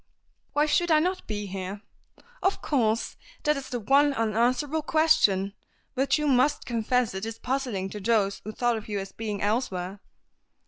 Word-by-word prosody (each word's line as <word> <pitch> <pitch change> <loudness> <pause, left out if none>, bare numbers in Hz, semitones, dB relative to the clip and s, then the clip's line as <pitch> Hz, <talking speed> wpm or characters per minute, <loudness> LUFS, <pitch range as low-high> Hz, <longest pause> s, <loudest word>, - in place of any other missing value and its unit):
"Why 295 +1 +3
should 345 +3 +2
I 315 - +6
not 365 +4 0
be 210 -1 -3
here?" 195 +1 -6 0.6
"Of 385 - +1
course! 230 -6 0 0.3
That 300 -1 +3
is 275 -1 -6
the 245 - -2
one 275 +6 +3
unanswerable 245 +7 +1
question. 210 -13 +3 0.4
But 270 +4 +2
you 300 - -1
must 275 +1 +2
confess 240 0 0
it 190 +1 -5
is 225 0 -4
puzzling 250 -8 -2
to 210 - -6
those 200 -1 +1
who 215 - -5
thought 240 +1 0
of 220 - -8
you 205 - -2
as 195 0 -6
being 215 -2 -4
elsewhere." 200 -4 -1
235 Hz, 170 wpm, -27 LUFS, 205-280 Hz, 0.6 s, I